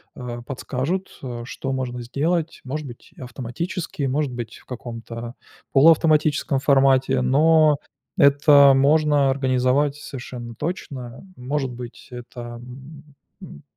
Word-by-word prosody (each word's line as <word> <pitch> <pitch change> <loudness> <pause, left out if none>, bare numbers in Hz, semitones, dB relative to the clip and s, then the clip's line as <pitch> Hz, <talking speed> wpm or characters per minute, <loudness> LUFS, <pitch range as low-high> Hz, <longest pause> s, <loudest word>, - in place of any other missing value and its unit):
э, 120 -1 -6
подскажут, 145 +7 -4
э, 120 -3 -6
что 135 +2 -5
можно 125 -2 -3
сделать. 155 +7 -2
Может 145 +2 -5
быть 120 +4 -13
автоматически, 140 - -5
может 140 +1 0
быть 120 -3 -6
в - - -20
каком-то 115 -1 -7 0.4
полуавтоматическом 155 -1 +4
формате, 135 -2 +3
но 155 +3 +4 0.4
это 140 0 +6
можно 145 0 +3
организовать 135 +2 +1
совершенно 120 -4 -8
точно. 130 - -6
Может 135 +2 -2
быть, 120 0 -10
это, 120 -1 -8 0.8
м, 70 - -12
135 Hz, 110 wpm, -22 LUFS, 125-150 Hz, 0.8 s, это